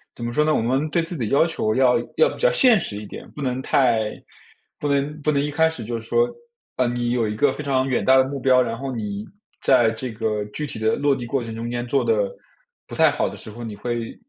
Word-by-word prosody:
怎 120 - -6
么 120 - -3
说 150 - +3
呢， 155 0 +2
我 - - +1
们 130 +6 0
对 170 +3 +1
自 165 +2 -5
己 115 -6 -2
要 140 - +4
求 110 -10 -1
要 130 -2 +4 0.2
要 475 - +5
比 - - -9
较 - - +4
现 255 - +5
实 110 - -3
一 105 - -7
点， - - -10
不 150 - -9
能 130 -1 -1
太 115 -6 +2 0.7
不 150 - -2
能 145 +2 -1
不 150 - +1
能 140 -2 +1
一 145 +1 -2
开 160 +2 +3
始 160 -8 -7
就 120 +2 -3
是 115 - -8
说， 120 +1 +3 0.5
呃， 125 - +2
你 120 0 -1
有 120 -2 +1
一 105 - -3
个 135 +6 +3
非 150 - -6
常 135 -2 +1
远 130 - 0
大 130 0 +5
的 130 - +6
目 140 +1 -5
标， 130 -1 +4
然 115 -2 -2
后 135 +2 -4
你 105 -4 -4 0.4
在 120 -4 +4
这 120 +2 -5
个 110 -1 -2
具 130 +9 -5
体 135 - -6
的 110 0 +2
落 145 -1 +2
地 125 - -6
过 130 +1 -1
程 115 -1 -6
中 115 +1 -4
间 120 0 -3
做 135 +1 +1
得 105 -4 +1 0.6
不 - - -8
太 - - +5
好 - - -1
的 - - -10
时 - - -10
候 120 +3 -9
你 110 -3 -6
会 120 +2 -4
125 Hz, 290 characters per minute, -22 LUFS, 115-140 Hz, 0.7 s, 的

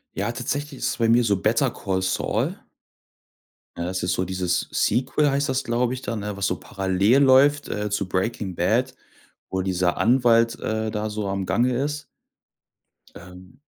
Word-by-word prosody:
Ja, 105 +4 -1
tatsächlich 140 +3 -4
ist - - -1
es - - -3
bei 115 -1 +2
mir 120 +1 +5
so 100 -4 +2
„Better 115 +6 +2
Call 95 -1 -2
Saul”. 95 0 -1 1.2
Ne, 85 - -3
das 95 0 -3
ist 90 - 0
so 90 - -1
dieses 90 -1 -1
Sequel, 135 +4 +1
heißt 140 0 0
das, 130 0 0
glaube 120 +1 0
ich 130 - -6
da, 115 - -4
ne, 105 -1 -4
was 100 -1 -1
so - - -1
parallel 95 +6 +1
läuft, 140 +2 +4
äh, 105 0 -2
zu 100 -2 -2
„Breaking 95 0 -2
Bad”, - - +1 0.5
wo 95 0 -2
dieser 90 -1 0
Anwalt, 115 -1 +3
äh, 110 0 -2
da 105 0 -3
so 105 -2 -3
am 95 -1 -2
Gange 120 +6 +1
ist. 150 +1 -3 1.1
Ähm 90 +7 -14
110 Hz, 175 wpm, -23 LUFS, 95-125 Hz, 1.2 s, mir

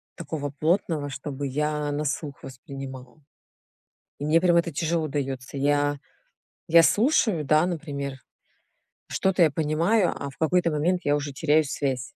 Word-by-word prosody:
такого 155 -3 -4
плотного, 160 -3 0
чтобы 140 +1 -5
я 150 +2 -1
на 150 +1 -2
слух 145 0 -4
воспринимала. 130 0 -9 1.0
И 145 - -5
мне 155 +3 +4
прям 175 -1 +3
это 170 0 +2
тяжело 160 +1 -1
даётся. 135 -1 -4
Я, 145 +1 +1 0.7
я 165 +1 +7
слушаю, 210 - +2
да, 155 +4 +3
например, 140 -6 -4 0.9
что-то 190 -2 +2
я 155 - +4
понимаю, 165 +7 +1
а 140 - -5
в - - -21
какой-то 170 +1 +2
момент 170 +4 +1
я 145 - +2
уже 145 -1 -3
теряю 155 +2 +2
связь 135 -3 -2
150 Hz, 145 wpm, -25 LUFS, 140-165 Hz, 1.0 s, я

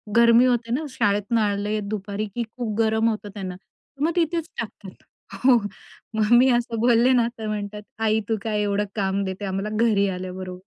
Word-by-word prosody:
गर्मी 235 +1 +6
होते 235 -2 +1
ना, 305 +4 -1
शाळेतून 210 -3 0
आले 210 0 0
दुपारी 205 0 -4
की 240 - -1
खूप 220 -4 -3
गरम 220 0 +3
होतं 215 -1 -4
त्यांना. 185 -3 -5 0.5
मग 325 +3 +2
तिथेच 335 -1 0
टाकतात. 205 -4 -8 0.4
हो. 255 -3 +7 0.6
मग 215 +1 +1
मी 260 +2 +5
असं 235 -2 -3
बोलले 240 +1 +4
ना 235 -2 +3
तर 220 - -4
म्हणतात, 210 0 -4 0.2
"आई 220 0 +2
तू 220 - +1
काय 210 -2 -1
एवढं 205 0 0
काम 195 -1 0
देते 190 +2 -4
आम्हाला 195 +2 -2 0.2
घरी 200 -3 +3
आल्याबरोबर." 185 0 -6
215 Hz, 175 wpm, -24 LUFS, 200-235 Hz, 0.6 s, हो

